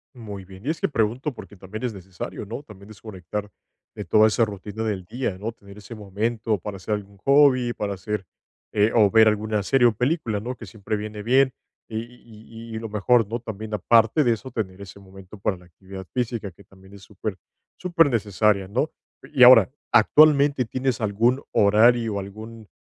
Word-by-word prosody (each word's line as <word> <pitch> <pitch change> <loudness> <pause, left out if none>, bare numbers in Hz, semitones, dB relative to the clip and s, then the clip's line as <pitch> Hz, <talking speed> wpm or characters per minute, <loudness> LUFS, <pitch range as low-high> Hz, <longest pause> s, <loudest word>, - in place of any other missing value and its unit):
Muy 100 -5 -9
bien, 95 +4 -14
y - - -2
es 160 - -2
que - - +1
pregunto, 125 +2 -1
porque 105 - -12
también 105 +6 -8
es 120 -3 -2
necesario, 95 +2 -8
¿no? 120 +7 -7
También 100 -4 -14
desconectar 105 -1 -7 0.4
de - - -7
toda 110 0 +5
esa 115 +1 +2
rutina 105 +1 -7
del 100 -4 -2
día, 110 -2 -4
¿no? 110 +4 -4
Tener 100 -2 -16
ese 105 +3 -11
momento 110 +2 -2
para 100 +2 -7
hacer 105 +3 -4
algún 100 -1 -6
hobby, 130 +1 +4
para 100 -3 -3
hacer 105 0 -4 0.5
eh, 105 +1 +2
o 105 -3 +5
ver 110 -1 +6
alguna 105 0 0
serie 125 +4 +3
o - - -1
película, 125 -3 -1
¿no? 125 +4 -5
Que 115 - -10
siempre 105 +1 -5
viene 105 0 -6
bien, 130 +3 +3 0.4
y 110 - -5
y 115 -1 -14
y - - -3
lo 115 - -6
mejor, 110 +2 +2
¿no? 115 +2 -4
También 110 -1 -7
aparte 115 +6 +3
de 120 - +3
eso, 115 +4 -4
tener 95 -4 -4
ese 100 0 -11
momento 95 +1 -14
para 95 -1 -2
la 90 - -18
actividad 95 +2 -11
física, 120 -5 -2
que 100 - -19
también 95 +1 -19
es 100 - -13
súper, 105 0 -6 0.4
súper 170 -4 +2
necesaria, 105 -3 +1
¿no? 130 +8 0 0.4
Y 130 -3 +5
ahora, 125 +1 +8 0.2
¿actualmente 140 +3 +5
tienes 130 0 -2
algún 115 +6 +1
horario, 110 +1 +3
algún 110 +2 -10
110 Hz, 190 wpm, -23 LUFS, 100-120 Hz, 0.5 s, ahora